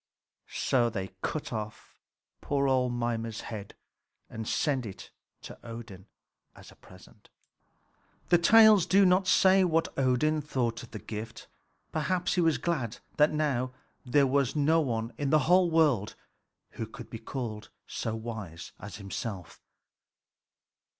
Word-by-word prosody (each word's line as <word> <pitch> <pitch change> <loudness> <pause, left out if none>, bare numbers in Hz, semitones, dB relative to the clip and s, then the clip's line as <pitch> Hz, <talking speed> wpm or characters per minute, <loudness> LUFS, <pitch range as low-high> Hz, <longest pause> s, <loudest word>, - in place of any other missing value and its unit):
So 120 -3 +1
they 95 -4 -5
cut 155 -5 -3
off 110 -1 -7 0.5
poor 140 -1 0
old 130 -2 +2
Mimer's 115 -2 -3
head 105 -3 -8 0.6
and 110 -1 -6
sent 135 -4 0
it 95 - -10 0.3
to - - -10
Odin 115 -4 -9 0.5
as - - -14
a - - -18
present. 95 -1 -18 1.0
The 175 - +5
tales 215 -1 +7
do 195 +1 +5
not 185 +1 +3
say 190 +1 +5
what 165 -2 +1
Odin 135 +4 +2
thought 120 -6 -2
of 120 - -11
the 110 - -7
gift. 110 +1 -8 0.4
Perhaps 175 +4 0
he 180 - +2
was 165 -4 +3
glad 130 -6 -2 0.2
that 150 +1 +5
now 135 -5 -1 0.3
there 140 +2 +3
was 135 0 +1
no 155 +3 +3
one 115 -4 -2
in 145 -2 0
the 155 - +5
whole 180 +1 +4
world 150 -11 +2 0.6
who 115 - -5
could - - -11
be 115 - -6
called 110 -2 -6 0.2
so 110 - -4
wise 110 -7 -7
as 105 - -8
himself. 100 -2 -6
125 Hz, 140 wpm, -29 LUFS, 110-155 Hz, 1.0 s, tales